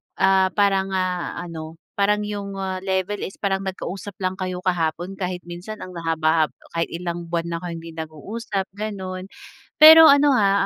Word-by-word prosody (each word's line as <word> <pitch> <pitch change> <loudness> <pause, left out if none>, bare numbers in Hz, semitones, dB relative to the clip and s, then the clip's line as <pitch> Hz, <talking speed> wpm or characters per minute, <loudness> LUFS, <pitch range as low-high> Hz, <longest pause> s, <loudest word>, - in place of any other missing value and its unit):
ah, 190 0 +4
parang 195 -2 +2
ah, 185 -1 -2
ano, 160 -2 -8 0.2
parang 210 +1 +2
yung 200 -1 -5
ah, 190 -1 -3
level 190 +1 -2
is 190 - -6
parang 195 -1 -1
nagka-usap 190 +1 -6
lang 185 0 0
kayo 185 -1 -4
kahapon 175 +1 -1
kahit 180 -1 -3
minsan 175 +5 -8
ang 185 - -9
haba 160 -1 +2
hab 130 - -25 0.2
kahit 165 0 -1
ilang 170 0 -5
buwan 170 0 -2
na 165 - -2
kayong 175 -1 -6
hindi 165 - -9
nag-uusap 190 - -5
ganun. 190 -3 -5 0.5
Pero 320 +1 +11
ano 285 0 +6
ha, 200 -4 +3
185 Hz, 170 wpm, -22 LUFS, 170-200 Hz, 0.5 s, Pero